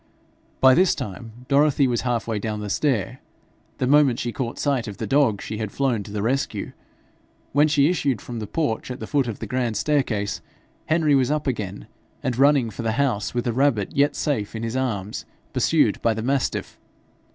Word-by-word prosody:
By 130 0 +8
this 180 +5 +4
time 115 +4 -8
Dorothy 140 0 +4
was 120 -2 0
half 120 -3 -1
way 110 -2 -1
down 105 0 -3
the 105 -1 -4
stair: 125 -3 0 0.6
the - - 0
moment 140 -2 +4
she 120 - -2
caught 120 -1 -4
sight 135 -5 0
of 105 - -7
the - - -3
dog 135 -8 +2
she 110 0 -5
had 110 -2 -3
flown 130 -6 0
to 100 - -9
the 105 -1 -3
rescue. 135 +4 -1 0.8
When 145 +2 +4
she 145 -2 +3
issued 145 - 0
from 120 +2 -7
the 105 - -5
porch 145 -7 -2
at 125 +1 -5
the - - -5
foot 140 -4 +1
of 115 - -4
the - - -6
grand 120 -1 -1
staircase, 110 -7 0 0.5
Henry 155 -2 +3
was 135 -2 +3
up 150 0 0
again, 105 -7 -3 0.4
and 130 - -1
running 135 -3 +4
for 110 - -6
the 115 -1 0
house 120 -5 0
with 120 - 0
the 120 - 0
rabbit 125 -6 +1
yet 145 +1 +3
safe 115 -9 -2
in 110 - -4
his 115 +1 -3
arms, 110 -6 -2 0.3
pursued - - +2
by 115 -1 +2
the 110 - -4
mastiff. 135 +1 -1
125 Hz, 200 wpm, -23 LUFS, 110-140 Hz, 0.8 s, By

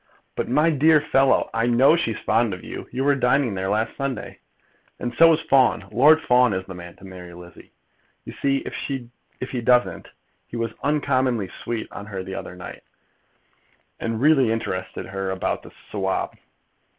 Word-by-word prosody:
"But, - - -3
my 150 +6 +3
dear 155 +1 +5
fellow 135 -2 +2
" - - -33
"I 115 +1 +1
know 130 +6 +5
she's 115 -10 -1
fond 115 -4 +1
of 90 - -13
you. - - -7
You 130 +2 -2
were 145 +1 +4
dining 130 -2 +2
there 95 0 -2
last 110 +2 -1
Sunday. 140 -5 -4 0.6
"And 120 -1 -3
so 165 +6 +7
was 165 0 +2
Fawn. 130 -3 +3
Lord 150 +8 +5
Fawn 125 -2 +4
is 95 0 -3
the 95 - -8
man 85 -1 -10
to - - -20
marry 90 -2 -10
Lizzie. 85 -1 -14 0.5
You - - -8
see 135 -1 -1
if 125 -1 -7
he 125 - -2
doesn't. 125 +1 +2 0.4
He 120 - -7
was 115 -1 -2
uncommonly 130 -8 0
sweet 115 -2 -3
on 100 - -8
her 95 -3 -5
the 95 - -7
other 90 -2 -7
night, 90 - -9 1.2
and 115 -1 -2
really 135 -4 +4
interested 95 -5 -3
her 95 0 -4
about 95 0 -2
the - - -13 0.2
Sawab." 95 -2 -1
120 Hz, 175 wpm, -23 LUFS, 95-135 Hz, 1.2 s, so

